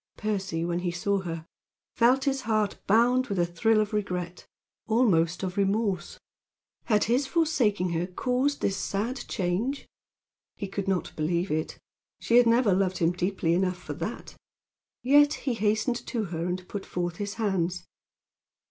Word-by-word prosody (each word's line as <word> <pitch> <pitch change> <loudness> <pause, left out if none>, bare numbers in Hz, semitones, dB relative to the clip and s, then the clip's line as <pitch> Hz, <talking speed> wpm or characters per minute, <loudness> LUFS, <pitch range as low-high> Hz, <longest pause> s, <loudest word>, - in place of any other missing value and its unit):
Percy, 195 -6 -2
when 175 0 -1
he 180 0 -1
saw 195 +3 0
her, 165 -3 -5 0.5
felt 250 +3 +4
his 270 -2 0
heart 215 -3 0
bound 245 +5 +4
with 200 - -3
a 175 - +3
thrill 215 +6 +2
of 215 0 -1
regret 180 -4 -3 0.4
almost 190 -7 +2
of 185 +1 -3
remorse. 200 -1 0 0.7
Had 210 -3 +3
his 250 +5 +1
forsaking 250 - +1
her 170 +1 -1
caused 255 +9 -1
this 195 - +1
sad 210 +7 -2
change? 210 +9 -2 0.7
He 200 - -5
could 195 0 -4
not 190 -3 -1
believe 170 +4 -1
it. 155 +1 -2 0.4
She 235 - +3
had 245 -1 +6
never 230 -3 +4
loved 185 0 +1
him 165 0 +2
deeply 180 -1 0
enough 185 0 +1
for 180 - -7
that. - - -6 0.7
Yet 290 +3 +5
he 260 - -2
hastened 220 +3 0
to 230 -3 -1
her 170 -3 -3
and 180 0 -4
put 200 -2 -5
forth 175 -1 -3
his 205 0 -4
hands. 185 -5 -1
200 Hz, 155 wpm, -27 LUFS, 180-230 Hz, 0.7 s, had